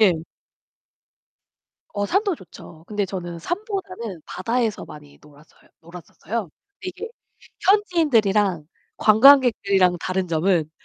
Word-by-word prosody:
예. 200 -5 +6 1.8
어 205 0 -2
산도 395 - +1
좋죠. 165 - -14
근데 205 0 -2
저는 175 -3 -6
산보다는 235 - -5
바다에서 230 +2 -2
많이 150 -1 -14
놀았어요 150 +1 -21
놀았었어요. 175 +4 -7 0.3
이게 370 +4 -6 0.6
현지인들이랑 225 - +2 0.3
관광객들이랑 215 -6 +5
다른 185 0 -2
점은 165 -1 +1
200 Hz, 260 characters per minute, -22 LUFS, 175-260 Hz, 1.8 s, 예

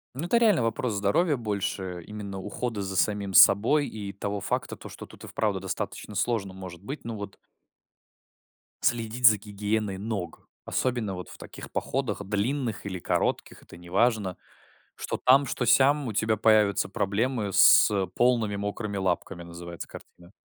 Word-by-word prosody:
Ну, 145 +6 -3
это 235 - +3
реально 215 - +4
вопрос 115 +1 -1
здоровья, 105 - +1
больше 100 -5 -3
именно 105 -2 -7
ухода 105 +2 -4
за 95 0 -5
самим 100 0 0
собой 130 +11 +6
и 100 -2 -7
того 100 +1 -4
факта, - - -2
то, - - -10
что - - -10
тут - - -15
и - - -9
вправду 105 -3 -1
достаточно 95 +2 -5
сложно 100 -2 -1
может 95 -1 -10
быть. 140 +7 -7
Ну 115 -1 -5
вот 100 -2 -7 1.5
Следить 120 +1 0
за 110 -1 +6
гигиеной 105 0 -3
ног, 100 -4 -5 0.2
особенно 120 -6 -1
вот 90 -2 -7
в - - -12
таких - - -10
походах, 130 -5 -2
длинных 110 +2 -2
или 95 -2 -4
коротких- - - -1
это - - -14
неважно. 95 +2 0 0.6
Что - - -4
там, 135 +2 +6
что 125 -1 -2
сям 135 +4 +4
у 110 - -4
тебя 110 +1 +1
появятся 105 -3 +3
проблемы 105 +3 -1
с - - +7 0.2
полными 120 -4 +2
мокрыми 100 +1 -4
лапками, 95 -1 -2
называется 85 0 -8
картина. 90 +1 -14
105 Hz, 155 wpm, -27 LUFS, 95-120 Hz, 1.5 s, с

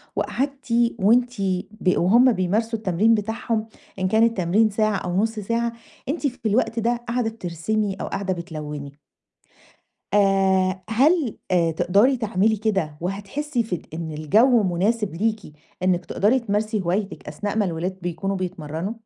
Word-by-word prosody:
وقَعدتِ 275 0 -3 0.3
وأنتِ 240 +2 +3 0.3
ب 200 -4 0
وهُم 235 +9 +5
بيمارسوا 220 +4 0
التمرين 210 +3 +3
بتاعهم، 220 +1 -2 0.3
إن 185 - +1
كان 220 +4 +3
التمرين 215 -1 +3
ساعة 215 0 +1
أو 180 -1 -3
نُص 220 +2 0
ساعة 230 +3 -1 0.4
أنتِ 300 0 0
في 250 -3 -8
الوقت 225 +1 +1
ده 235 +2 +1
قاعدة 240 -1 0
بترسمي 205 +1 -2
أو - - -3
قاعدة 195 -1 -2
بتلوني. 150 -5 -7 1.2
آآ 190 -2 +3
هل 270 - +2
آآ 170 -2 +3
تِقدَري 195 - +3
تعملي 220 -1 +1
كده 195 -8 -1
وهتحسي 205 - -2
في 185 -7 -4
إن 160 -1 -5
الجو 220 - +4
مناسب 195 +2 0
ليكِ 215 +4 0 0.4
إنِك 185 -1 +1
تِقدَري 220 +6 +2
تمارسي 215 -1 -1
هوايتِك 190 +3 -2
أثناء 205 0 -4
ما 210 - +3
الولاد 180 +1 -3
بيكونوا 175 +3 -2
بيتمرنوا؟ 175 0 -4
205 Hz, 140 wpm, -23 LUFS, 185-225 Hz, 1.2 s, وهُم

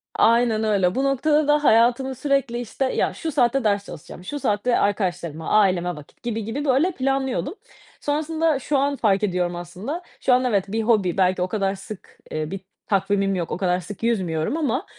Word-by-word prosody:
aynen 230 -1 +3
öyle 195 -4 +2
bu 265 - +1
noktada 295 +2 +2
da 295 0 +3
hayatımı 245 +2 +3
sürekli, 275 -3 0
işte, 245 +3 -2
ya, - - 0
şu 325 - -4
saatte 265 -1 +2
ders 200 -2 +1
çalışacağım, 165 +3 -10
şu 290 +10 -5
saatte 210 +2 +1
arkadaşlarıma, 175 -6 -1
aileme 185 -4 +2
vakit 150 -1 -15
gibi 225 -2 -2
gibi 275 +7 -3
böyle 280 +7 +3
planlıyordum. 270 -1 -1 0.5
Sonrasında 315 0 0
şu 285 +2 0
an 280 +1 +1
fark 210 -6 +1
ediyorum. 180 -3 0
Aslında 185 - -6 0.2
şu 255 - +3
an 255 +1 +3
evet 200 -6 +1
bir 225 +1 0
hobi 205 -7 +2
belki 185 -1 +2
o 180 - +1
kadar 195 0 -1
sık, 195 +1 -11
eee, 155 +1 -3
bir 195 - -4 0.3
takvimim 195 0 +1
yok. 175 -3 -3
O - - -2
kadar 180 -1 +1
sık 195 +4 -9
yüzmüyorum 185 - 0
ama 310 - -1
220 Hz, 185 wpm, -23 LUFS, 185-270 Hz, 0.5 s, aynen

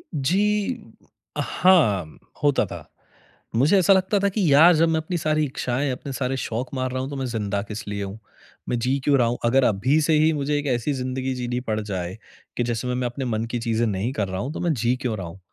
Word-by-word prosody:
जी। 205 - 0 0.4
हाँ, 110 - +2 0.3
होता 145 -2 +3
था। - - -9 0.7
मुझे 145 - +4
ऐसा 190 +2 +5
लगता 190 +2 +2
था 200 +1 +2
कि 205 +2 -2
यार 165 +5 +8
जब 165 +1 +3
मैं 160 -1 +1
अपनी 175 +2 -3
सारी 155 -1 +1
इच्छाएँ, 135 0 -2
अपने 135 +2 -6
सारे 130 +1 -2
शौक 125 +2 -4
मार 130 -1 -2
रहा 130 0 -2
हूँ 130 - -4
तो 145 - -6
मैं 135 - -2
जिंदा 105 -4 -2
किसलिए 100 -1 -5
हूँ? 100 +2 -7 0.5
मैं 120 - 0
जी 130 +4 0
क्यों 140 -1 +4
रहा 120 - +3
हूँ? 120 +1 -1
अगर 130 +3 +4
अभी 125 +9 +2
से 155 +1 +2
ही 155 +1 +4
मुझे 145 0 -1
एक 145 - -4
ऐसी 120 +5 -1
ज़िंदगी 130 0 -2
जीनी 125 0 -2
पड़ 110 -3 -2
जाए, 95 -1 -4 0.4
कि 120 - +1
जिसमें 120 +1 -2
मैं 125 0 -1
अपने 125 +2 -5
मन 115 -2 -1
की 120 - -1
चीज़ें 115 0 0
नहीं 105 +3 -1
कर 105 -6 -1
रहा 95 0 -4
हूँ 140 +5 -4
तो - - -5
मैं 170 -2 +1
जी 120 -1 +1
क्यों 115 -5 -2
रहा 90 -3 -5
हूँ? 90 +3 -11
130 Hz, 230 wpm, -23 LUFS, 115-150 Hz, 0.7 s, यार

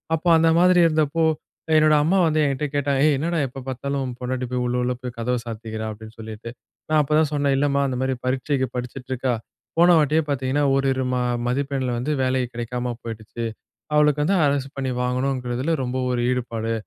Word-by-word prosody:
அப்ப 160 - -7
அந்த 165 0 +4
மாதிரி 180 0 +5
இருந்தப்போ, 160 0 +1 0.5
என்னோட 155 0 +5
அம்மா 175 +6 +2
வந்து 155 0 +1
என்கிட்ட 140 +1 -1
கேட்டா, 140 0 0
ஏய்! 155 - +4
என்னடா 170 +3 -1
எப்போ 130 +2 -9
பார்த்தாலும் 140 +2 -3
உன் 125 -1 -6
பொண்டாட்டி 125 0 -2
போய் 125 -1 0
உள்ள 120 - -1
உள்ள 125 0 0
போய் 125 -2 -7
கதவ 125 +2 0
சாத்திக்கிறா? 110 -1 -5
அப்படின்னுட்டு. 110 +1 -9 0.4
நான் 155 0 +4
அப்போ 145 - -2
தான் 155 -2 +1
சொன்னேன் 140 -2 +2
இல்லம்மா, 140 0 +2
அந்த 130 - -2
மாரி 130 - 0
பரீட்சைக்கு 130 +1 0
படிச்சுட்டு 125 +1 -6
இருக்கா, 130 0 0 0.4
போன 175 +1 +6
வாட்டியே 155 +1 +3
பார்த்திங்கன்னா 135 0 0
ஓரு 135 0 +1
இரு 130 0 -2
ம - - +1 0.3
மதிப்பெண்ல 130 0 -1
வந்து 125 +6 -2
வேல 130 0 +1
கிடைக்காம 120 +1 -3
போய்டுச்சு. 115 +1 -6 0.5
அவளுக்கு 150 -1 +4
வந்து 190 +7 +2
அரசு 140 -1 +1
பண்ணி 135 -1 -2
வாங்கணுங்கிறதில 125 +2 -1
ரொம்ப 130 0 -2
ஒரு 125 -1 0
ஈடுபாடு. 115 -3 -2
130 Hz, 180 wpm, -23 LUFS, 125-145 Hz, 0.5 s, போன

